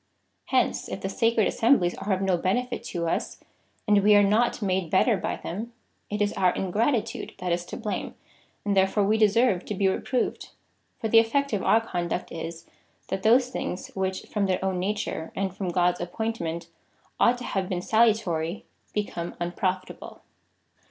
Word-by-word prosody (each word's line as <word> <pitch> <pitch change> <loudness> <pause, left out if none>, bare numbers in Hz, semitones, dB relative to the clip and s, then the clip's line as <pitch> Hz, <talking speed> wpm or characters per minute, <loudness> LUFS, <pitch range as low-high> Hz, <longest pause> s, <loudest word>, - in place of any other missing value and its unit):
Hence - - 0
if - - -5
the - - -2
sacred 230 -3 +2
assemblies 225 -8 +3
are 195 +2 -4
of 190 0 +1
no 190 -2 +2
benefit 245 +8 -1
to 170 -2 -3
us, - - -2 0.5
and 205 -1 +5
we 210 +1 +6
are 205 - +7
not 215 +4 +2
made 190 -5 -1
better 210 +6 +4
by 185 - -2
them, 220 +7 -6 0.4
it 210 0 0
is 205 - -1
our 185 -1 +3
ingratitude 215 +5 -1
that 180 -2 -3
is 175 0 0
to - - -7
blame, 220 -4 -4 0.5
and 200 -1 +1
therefore 190 +2 +3
we 215 +2 +2
deserve 215 -2 +3
to 210 - -4
be 195 0 +2
reproved. 245 +6 -1 0.5
For 225 - -1
the 225 +1 +7
effect 280 +4 +1
of 205 - +1
our 225 - +4
conduct 175 -5 -3
is, 165 0 -6 0.4
that 190 - -2
those 245 +4 +4
things, 190 -7 -4
which, 190 -1 -3
from 205 -2 -1
their 185 -1 +1
own 190 -1 0
na 195 +3 0
ture, 160 -6 -4
and 190 -1 -2
from 185 -2 -3
God's 175 0 +1
appointment, 175 -3 -3 0.5
ought 245 +1 +4
to 245 - -8
have 195 -5 -2
been 180 -2 -2
salu 220 +2 +4
tary, 165 +2 -3 0.3
become 175 -5 -3
unprofitable. 185 +2 -3
195 Hz, 180 wpm, -26 LUFS, 180-220 Hz, 0.5 s, are